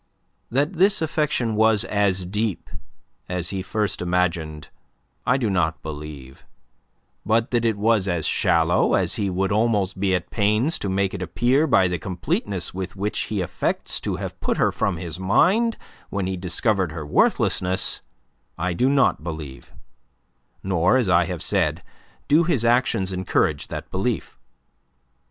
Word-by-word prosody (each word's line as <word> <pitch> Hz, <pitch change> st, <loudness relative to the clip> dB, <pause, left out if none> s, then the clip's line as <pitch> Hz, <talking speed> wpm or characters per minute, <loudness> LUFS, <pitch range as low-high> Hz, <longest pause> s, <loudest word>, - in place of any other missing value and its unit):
That 145 Hz, +8 st, 0 dB
this 195 Hz, +3 st, +3 dB
affection 150 Hz, -7 st, 0 dB
was 110 Hz, -1 st, +4 dB
as 95 Hz, -3 st, +1 dB
deep 105 Hz, +1 st, -3 dB, 0.6 s
as 90 Hz, -1 st, -2 dB
he 95 Hz, -1 st, -3 dB
first 105 Hz, +1 st, -2 dB
imagined, 85 Hz, -4 st, -1 dB, 0.6 s
I 125 Hz, -, +4 dB
do 125 Hz, -4 st, -1 dB
not 80 Hz, -5 st, 0 dB
believe; 75 Hz, -4 st, -8 dB, 0.8 s
but 110 Hz, +3 st, +1 dB
that 120 Hz, -1 st, +1 dB
it 110 Hz, -2 st, +1 dB
was 105 Hz, -2 st, +2 dB
as 85 Hz, -4 st, -1 dB
shallow 85 Hz, +1 st, +2 dB
as -, -, 0 dB
he 100 Hz, -, 0 dB
would 95 Hz, +1 st, -1 dB
almost 105 Hz, -3 st, +1 dB
be 95 Hz, -1 st, +2 dB
at 90 Hz, -1 st, -4 dB
pains 110 Hz, +9 st, +2 dB
to 100 Hz, -, -3 dB
make 95 Hz, 0 st, 0 dB
it 100 Hz, -, -5 dB
appear 130 Hz, -, +1 dB
by 95 Hz, -9 st, +4 dB
the 90 Hz, -1 st, -2 dB
completeness 90 Hz, +1 st, -2 dB
with 95 Hz, 0 st, -5 dB
which 105 Hz, +2 st, -2 dB
he 105 Hz, -3 st, -1 dB
affects 90 Hz, -, -1 dB
to -, -, -2 dB
have -, -, -6 dB
put -, -, -1 dB
her -, -, +2 dB
from 95 Hz, -4 st, -1 dB
his 85 Hz, 0 st, -5 dB
mind 190 Hz, -, +3 dB, 0.3 s
when 100 Hz, -2 st, -2 dB
he 95 Hz, 0 st, -2 dB
discovered 90 Hz, 0 st, 0 dB
her 80 Hz, -2 st, -6 dB
worthlessness, 90 Hz, +5 st, +1 dB, 0.6 s
I 90 Hz, +2 st, -1 dB
do 125 Hz, +10 st, +2 dB
not 135 Hz, -, +2 dB
believe; 80 Hz, -5 st, -7 dB, 0.9 s
nor, 95 Hz, +5 st, +2 dB
as 120 Hz, -7 st, +1 dB
I 90 Hz, -1 st, +4 dB
have 85 Hz, -1 st, -4 dB
said, -, -, 0 dB, 0.4 s
do 155 Hz, +4 st, +5 dB
his 145 Hz, -9 st, 0 dB
actions 115 Hz, -5 st, +2 dB
encourage 90 Hz, -5 st, 0 dB
that -, -, -7 dB
belief. 100 Hz, +5 st, -2 dB
95 Hz, 155 wpm, -23 LUFS, 90-115 Hz, 0.9 s, do